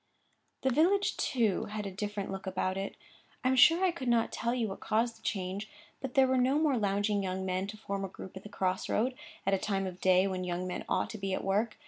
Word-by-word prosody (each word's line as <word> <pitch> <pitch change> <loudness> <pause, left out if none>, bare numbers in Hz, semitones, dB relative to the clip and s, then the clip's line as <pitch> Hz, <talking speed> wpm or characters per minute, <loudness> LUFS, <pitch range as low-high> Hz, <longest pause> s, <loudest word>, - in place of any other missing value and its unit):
The 265 - +3
village, 365 +9 +3
too, 225 -7 +1
had 210 0 -5
a 195 - -4
different 205 0 -4
look 195 0 -6
about 185 0 -1
it. 195 +1 -4 0.5
I 255 - +3
am 260 - +3
sure 340 +7 +7
I 365 - +3
could 280 -7 -6
not 235 -1 +3
tell 235 - -1
you 240 -3 0
what 195 - -6
caused 230 +2 0
the - - -26
change; 195 +1 -3 0.3
but 265 -2 -6
there 270 -1 +7
were 260 0 +2
no 260 +3 +3
more 305 -3 +3
lounging 205 -1 +1
young 190 0 -2
men 185 +1 -1
to 215 +1 -7
form 200 -2 -4
a - - -1
group 190 0 -10
at 190 - -7
the 210 - -10
cross 185 -2 -1
road, 250 +4 +1 0.3
at 195 - +2
a 195 - +3
time 195 -1 -1
of 185 -1 -6
day 185 0 +5
when 185 -1 -2
young 180 0 -2
men 180 - -4
ought - - 0
to 220 - -7
be 195 -1 -1
at - - -4
work. 210 +4 0
205 Hz, 255 wpm, -31 LUFS, 190-245 Hz, 0.5 s, sure